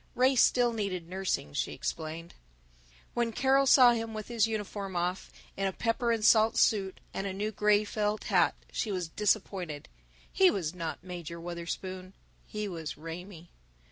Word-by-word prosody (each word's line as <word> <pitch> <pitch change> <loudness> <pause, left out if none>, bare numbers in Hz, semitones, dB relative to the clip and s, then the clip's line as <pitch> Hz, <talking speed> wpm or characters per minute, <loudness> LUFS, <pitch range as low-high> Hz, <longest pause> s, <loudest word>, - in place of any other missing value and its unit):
Ray 260 +2 +4
still 245 -1 +4
needed 190 -6 -3
nursing, 185 - -2
she - - -2
explained. 165 +1 -5 0.8
When 235 -1 0
Carol 270 +3 +3
saw 255 -2 +8
him 225 -1 -3
with 215 +1 -6
his 230 -2 +2
uniform 205 -3 -4
off, 180 +2 -2 0.3
in 195 0 0
a - - -1
pepper 235 +4 0
and 225 -2 0
salt 220 0 +5
suit 195 -3 +2
and 195 - -3
a 190 - -3
new 210 +3 -2
gray 210 0 +3
felt 210 0 -2
hat, 175 -6 +3 0.2
she 215 - -2
was 180 -3 -2
disappointed. 185 -5 -1 0.4
He 380 -1 +6
was 175 - -2
not 165 -2 -5
Major 175 -2 -7
Wutherspoon; 185 +2 -6 0.3
he 210 0 -4
was 165 -5 -6
Raymie. 170 +2 -9
195 Hz, 160 wpm, -30 LUFS, 175-220 Hz, 0.8 s, saw